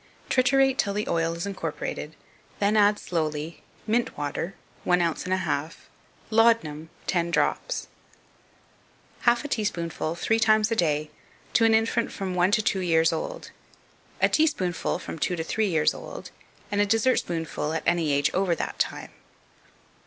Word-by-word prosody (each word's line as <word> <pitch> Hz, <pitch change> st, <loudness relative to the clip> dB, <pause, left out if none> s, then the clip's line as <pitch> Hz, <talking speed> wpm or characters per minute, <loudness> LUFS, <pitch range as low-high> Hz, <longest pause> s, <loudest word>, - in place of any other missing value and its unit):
Triturate 265 Hz, +1 st, +3 dB
till 200 Hz, -1 st, +1 dB
the 210 Hz, -, -2 dB
oil 165 Hz, 0 st, 0 dB
is 170 Hz, -, -4 dB
incorporated, 165 Hz, -4 st, -5 dB, 0.4 s
then 205 Hz, +1 st, +2 dB
add 210 Hz, 0 st, +5 dB
slowly 155 Hz, -2 st, -3 dB, 0.2 s
Mint 230 Hz, +2 st, 0 dB
water 150 Hz, +5 st, -3 dB, 0.3 s
One 180 Hz, 0 st, +3 dB
ounce 170 Hz, -2 st, -1 dB
and 185 Hz, -, 0 dB
a -, -, +2 dB
half 160 Hz, -3 st, -3 dB, 0.4 s
Laudanum 215 Hz, -9 st, +3 dB, 0.2 s
Ten 170 Hz, -2 st, 0 dB
drops -, -, 0 dB, 1.4 s
Half 240 Hz, +4 st, +1 dB
a -, -, -1 dB
teaspoonful 170 Hz, -, -2 dB
three 220 Hz, +6 st, +1 dB
times 215 Hz, -1 st, +3 dB
a -, -, +2 dB
day, 155 Hz, -5 st, 0 dB, 0.4 s
to 230 Hz, -, +4 dB
an 225 Hz, -1 st, +5 dB
infant 225 Hz, +1 st, +1 dB
from 190 Hz, -2 st, -4 dB
one 180 Hz, +1 st, +3 dB
to 215 Hz, +1 st, +2 dB
two 195 Hz, -, +1 dB
years 165 Hz, -2 st, +3 dB
old; -, -, -5 dB, 0.7 s
a -, -, +5 dB
teaspoonful 240 Hz, -, +1 dB
from 165 Hz, -, -7 dB
two 180 Hz, -, 0 dB
to 165 Hz, -, -3 dB
three 215 Hz, +6 st, 0 dB
years 160 Hz, -4 st, +2 dB
old; -, -, -9 dB, 0.4 s
and 205 Hz, 0 st, +2 dB
a 205 Hz, -, +2 dB
dessertspoonful 180 Hz, -, 0 dB
at 160 Hz, -1 st, -2 dB
any 170 Hz, -3 st, +2 dB
age 140 Hz, 0 st, +2 dB
over 185 Hz, -2 st, +1 dB
that -, -, -4 dB
time. -, -, -2 dB
185 Hz, 155 wpm, -26 LUFS, 165-220 Hz, 1.4 s, add